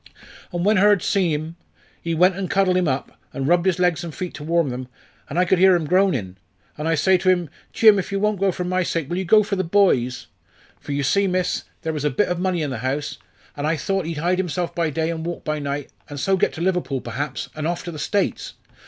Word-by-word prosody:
"And 175 0 -2
when 210 +1 +4
Hurd 205 0 +4
see 185 -4 +1
him, 155 +3 -4 0.4
he 165 -1 -2
went 180 +3 +4
and 195 -1 -4
cuddled 195 -2 +2
him 180 -2 +2
up, 135 -1 -3
and 135 0 -2
rubbed 175 +2 +3
his 185 - +2
legs 180 -1 +1
and 165 -3 -7
feet 180 -1 -5
to 145 - -8
warm 165 -1 +1
them, 125 +1 -5 0.4
an' 145 - -4
I 180 - +4
could 185 0 +2
hear 190 0 +6
him 170 -3 -1
groanin'. 150 - +1 0.4
And 150 +2 -4
I 165 - +2
says 185 +4 +3
to 185 - +2
him, 175 -5 +1 0.2
'Jim, 215 -3 +6
if 185 - -5
you 195 - -1
won't 210 -1 0
go 195 0 +2
for 180 - -4
my 185 +1 0
sake, 165 -4 -2
will 175 - -1
you 190 - -3
go 215 +4 +5
for 200 0 -2
the 185 - 0
boy's?' 165 -10 +2 0.5
For - - -8
you 140 0 -1
see, 195 +9 +2
miss, 185 -1 -1 0.2
there 160 - -2
was 150 -2 -3
a 150 - +2
bit 210 - 0
of 180 -1 -1
money 180 -3 0
in 145 - -3
the 125 - -4
house, 135 +4 -3 0.4
an' 145 +1 -2
I 160 - +2
thought 195 +4 -1
he'd 165 -2 -4
hide 175 +4 0
himself 175 -1 -2
by 170 -2 0
day 160 +2 -1
and 160 -1 -4
walk 170 0 -5
by 155 -1 -2
night, 140 0 -4 0.2
and 145 -1 -6
so 195 +7 +2
get 185 - +1
to 160 - -7
Liverpool 180 -7 0
perhaps, 140 -1 -4
and 155 0 -3
off 175 0 -2
to 175 - -6
the 155 - -8
States. 205 +5 -1
175 Hz, 255 wpm, -22 LUFS, 150-185 Hz, 0.5 s, hear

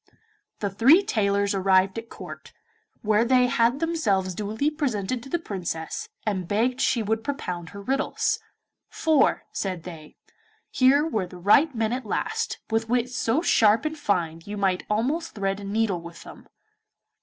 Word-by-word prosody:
The 200 -2 -1
three 265 - +6
tailors 200 - +1
arrived 190 +1 +2
at 230 0 -12
Court, - - -10 0.5
where 215 +1 +3
they 250 +1 +4
had 245 0 +2
themselves 210 - 0
duly 215 - -1
presented 255 -6 -2
to 270 - -11
the 345 - +1
Princess, 180 - -5 0.2
and 190 -5 -2
begged 245 +6 0
she 235 -3 +2
would 220 +1 -1
propound 180 - -4
her 200 - -9
riddles, 420 - 0 0.5
'for,' 310 -4 +2
said 185 -4 -3
they, 160 -4 -10 0.6
'here 275 +3 +4
were 215 - -1
the 180 - -11
right 245 - +4
men 225 0 0
at 250 -3 -4
last, 445 - -2
with 225 0 0
wits 250 +1 0
so 260 +6 +1
sharp 225 -2 +4
and 310 0 -2
so 300 - -16
fine 165 - -1
you 205 +3 -6
might 190 -2 0
almost 275 +11 -1
thread 195 -1 -1
a - - -9
needle 200 -3 0
with 170 0 -11
them. - - -13
220 Hz, 165 wpm, -25 LUFS, 195-270 Hz, 0.6 s, three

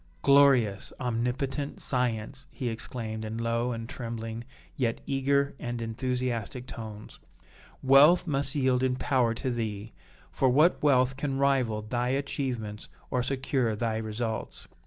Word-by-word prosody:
"Glorious, 135 -8 +4
omnipotent 130 +4 -2
science!" 125 0 -2
he 125 - -3
exclaimed 110 -1 -5
in 110 +1 -4
low 115 +1 0
and 115 -1 -5
trembling, 115 -1 -5 0.3
yet 120 -3 0
eager 140 +1 +1
and 120 0 -4
enthusiastic 125 +1 -2
tones. 110 -5 -9 0.6
"Wealth 140 +7 +7
must 140 -3 0
yield 130 -3 +2
in 130 -1 +1
power 130 -3 +1
to 130 +2 -2
thee, 110 -2 -4 0.4
for 130 - +2
what 150 +8 +4
wealth 130 -3 +3
can 140 -1 -2
rival 130 -6 +1
thy 120 +3 -1
achievements 125 -5 -3 0.2
or 125 - +1
secure 130 -3 0
thy 110 0 -1
results? 110 +1 -4
125 Hz, 130 wpm, -28 LUFS, 115-135 Hz, 0.6 s, Wealth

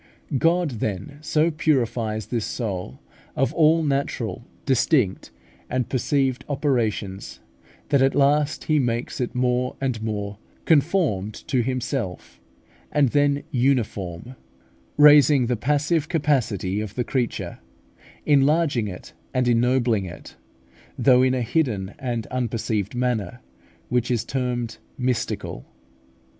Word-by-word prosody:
God 170 0 +2
then 105 +8 -4
so 155 +2 +2
purifies 120 - 0
this 115 -3 -2
soul 95 - -4 0.4
of 135 - +1
all 160 0 +4
natural, 135 -4 -2 0.2
distinct, 130 - +1 0.4
and 125 0 -1
perceived 130 0 0
operations, 115 -9 -1 0.5
that 140 - +3
at 135 0 +3
last 145 +1 +2
He 155 -1 +2
makes 120 -1 -2
it 125 - -3
more 125 0 0
and 125 -5 -2
more 105 -2 -4 0.3
conformed 145 - +2
to 130 - +2
Himself, 115 - -4 0.5
and 145 -3 +3
then 145 +1 +2
uniform, 120 -5 -1 0.6
raising 145 -2 +7
the 125 +1 0
passive 145 +6 0
capacity 115 - 0
of 105 -1 -6
the 125 - 0
creature, 125 -1 -3 0.7
enlarging 145 -4 +3
it 90 -2 -9 0.2
and 125 -1 +2
ennobling 120 -3 +2
it, 90 - -10 0.6
though 130 -2 +5
in 130 0 +3
a 125 - -1
hidden 110 -7 -1
and 120 -5 -3
unperceived 115 -4 -2
manner, 120 -3 -1 0.5
which 125 0 0
is 120 -2 0
termed 120 -4 -3 0.2
mystical. 125 - -2
125 Hz, 115 wpm, -23 LUFS, 110-140 Hz, 0.7 s, raising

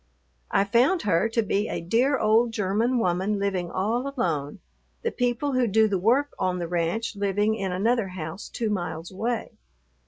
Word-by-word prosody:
I - - +3
found 250 - +2
her 195 +2 +2
to 230 0 +1
be 205 +1 0
a - - -2
dear 240 +11 +2
old 225 +1 +3
German 220 +4 +1
woman 190 0 0
living 190 -3 -1
all 230 +10 -1
alone, 150 - -1 0.5
the 465 - 0
people 245 +3 0
who 255 -2 +2
do 220 +1 +4
the 195 -3 0
work 255 +9 +2
on 185 -1 0
the 175 -1 -3
ranch 175 +7 -1
living 205 +2 +1
in 195 -4 -3
another 220 +4 +1
house 180 0 -7
two 225 -3 -2
miles 175 -3 -4
away. 225 +4 -3
210 Hz, 175 wpm, -25 LUFS, 185-235 Hz, 0.5 s, do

